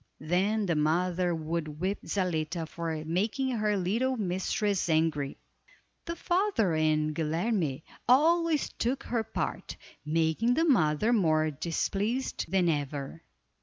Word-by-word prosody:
Then 190 +7 +1
the 175 - +1
mother 175 +3 +1
would 155 -1 -4
whip 190 +4 -1
Zaletta 165 -3 -1
for 160 -2 -4
making 210 - 0
her 210 -3 +1
little 230 +8 0
mistress 190 0 -1
angry. 155 -3 +1 0.7
The 335 - -4
father 350 - +1
and 155 -1 +1
Guilerme 160 - -1 0.3
always 320 +3 +4
took 250 +3 -2
her 230 -2 -1
part, 220 - -4 0.3
making 160 +10 +1
the 325 - +2
mother 215 - +3
more 155 -7 +2
displeased 195 - -2
than 185 -1 +2
ever. 145 0 -2
180 Hz, 120 wpm, -29 LUFS, 155-225 Hz, 0.7 s, always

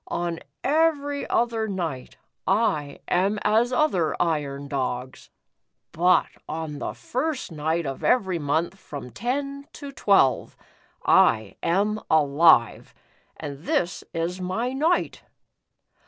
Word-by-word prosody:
On 170 -1 -2 0.2
every 290 -1 +1
other 230 -2 +1
night, 170 -10 -4 0.3
I 155 -9 0
am 195 +4 +1
as 225 +4 +3
other 200 - +1
iron 145 -4 -1
dogs, 130 -2 -4 0.6
but 180 +2 +4 0.2
on 155 -2 -4
the - - -4
first 270 - -3
night 160 +2 -1
of 135 -1 -5
every 190 -8 +2
month 160 +6 -1
from 140 -7 -8
ten 275 - -3
to 285 -2 -8
twelve, 195 - +2 0.5
I 110 -3 +4
am 205 +5 +1
alive, 150 -5 +4 0.4
and 140 -2 -6
tJiis 175 +2 -1
is 170 +2 -3
my 225 +8 -2
night." 315 +6 0
175 Hz, 110 wpm, -25 LUFS, 150-240 Hz, 0.6 s, but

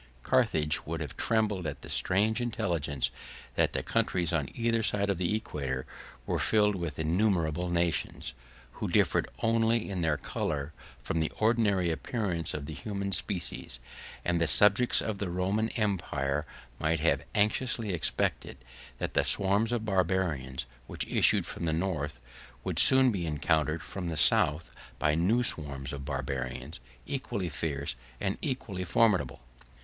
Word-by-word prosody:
130 125 -11 +2
Carthage 75 0 0
would 80 +1 -3
have 75 -5 -5
trembled 105 -6 0
at 75 - -6
the - - -9
strange 105 +5 +1
intelligence 85 - -1 0.4
that - - +1
the - - -2
countries 90 -2 0
on 75 -5 0
either 115 -1 +1
side 100 -2 +1
of 95 - -3
the 90 +3 +1
equator 70 - -4 0.4
were - - -1
filled 105 -1 +3
with 85 -6 -4
innumerable 85 0 +1
nations, 85 -7 -1 0.4
who - - -4
differed - - +2
only 115 0 +2
in 95 -2 -2
their 80 -3 +1
color 70 +1 -3 0.3
from 80 - -1
the 80 - 0
ordinary 105 -6 +2
appearance 85 - -2
of 75 -2 -4
the 80 - -6
human 100 +4 -4
species: 95 -2 -1 0.5
and 85 -1 +1
the 85 - +3
subjects 105 - +4
of 110 -3 -3
the 100 - -2
Roman 95 +5 0
empire 75 -9 -1 0.3
might 80 0 0
have 85 - +2
anxiously 105 0 +1
expected, 80 -4 -1 0.4
that - - -4
the - - +3
swarms 100 +4 +3
of 115 -2 -1
Barbarians, 90 - 0 0.2
which - - -3
issued - - +3
from 85 - -5
the 80 - 0
North, 80 -6 -2 0.4
would - - 0
soon 130 -1 +8
be 90 -5 -3
encountered 80 +1 0
from 90 -3 -5
the 80 - -3
South 75 +1 +4 0.3
by 75 - +2
new 100 +10 +2
swarms 70 - +1
of 70 -1 -6
Barbarians, 65 +1 -3 0.3
equally 130 -10 -3
fierce 70 -4 -3 0.2
and 95 -1 -2
equally 120 - -3
formidable. 100 - +2
90 Hz, 150 wpm, -29 LUFS, 75-105 Hz, 0.5 s, soon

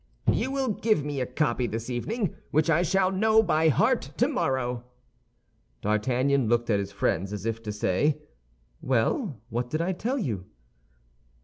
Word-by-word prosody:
"You - - 0
will 270 -2 -1
give 210 -7 +1
me 145 -2 -2
a 125 - -1
copy 125 -2 0
this 115 +1 -4
evening, 185 - -2 0.2
which 155 +2 +2
I 165 +2 +4
shall 185 +2 +2
know 220 +3 +4
by 160 -5 +3
heart 230 - +3 0.2
tomorrow." 130 - 0 1.0
D'Artagnan 125 +4 +1
looked 120 0 +2
at 100 - +3
his 100 0 -4
friends, 100 -1 -1
as 105 0 -5
if 115 0 -2
to 105 -2 -4
say, 105 +9 +1 0.6
"Well, 135 - 0
what 120 +1 -2
did 155 - -1
I 170 +3 0
tell 235 +9 -2
you?" 110 - -3
135 Hz, 155 wpm, -27 LUFS, 115-190 Hz, 1.0 s, I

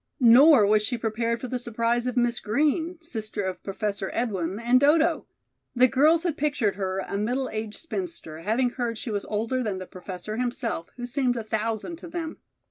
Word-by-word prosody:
Nor 250 0 +7
was 210 +1 +4
she 235 +3 -1
prepared 230 +1 -1
for 255 - -5
the 250 +1 -2
surprise 235 +1 0
of 250 - -3
Miss 240 -1 +2
Green, 310 +9 0
sister 220 -9 -4
of 190 -1 -4
Professor 200 0 -3
Edwin 195 -5 -1
and 240 +2 +4
Dodo. 315 +4 +3 0.5
The 250 +1 +6
girls 305 +7 +4
had 340 -4 -1
pictured 285 -9 +1
her 190 -1 -3
a 200 - -2
middle 250 +5 -1
aged 215 -1 -4
spinster, 330 - -5
having 230 +8 +1
heard 240 -3 -3
she 235 0 -5
was 205 -1 -2
older 225 +5 -1
than 210 -5 -2
the 185 - -6
Professor 185 +3 -7
himself, 240 -7 -2
who 245 - -4
seemed 245 -1 0
a 230 - -3
thousand 220 +8 -2
to 335 - -9
them. 330 -1 -5
235 Hz, 190 wpm, -26 LUFS, 210-265 Hz, 0.5 s, Nor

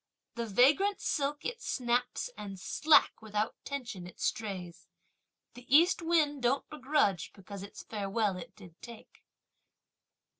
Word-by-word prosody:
The 235 -1 -4
vagrant 295 - +4
silk 290 0 -1
it 470 0 -4
snaps, 245 - -1
and 195 -2 -7
slack, 305 - +4
without 215 0 -2
tension 245 -10 -5
it 180 - -14
strays! 185 -6 -3 0.7
The 245 +1 -13
East 340 +6 +6
wind 310 -4 +2
don't 250 +3 +1
begrudge 265 - +1
because 200 0 -9
its 200 - -9
farewell 205 -1 -1
it 180 - -9
did 180 -6 -14
take! 235 -2 -12
235 Hz, 125 wpm, -31 LUFS, 200-290 Hz, 0.7 s, East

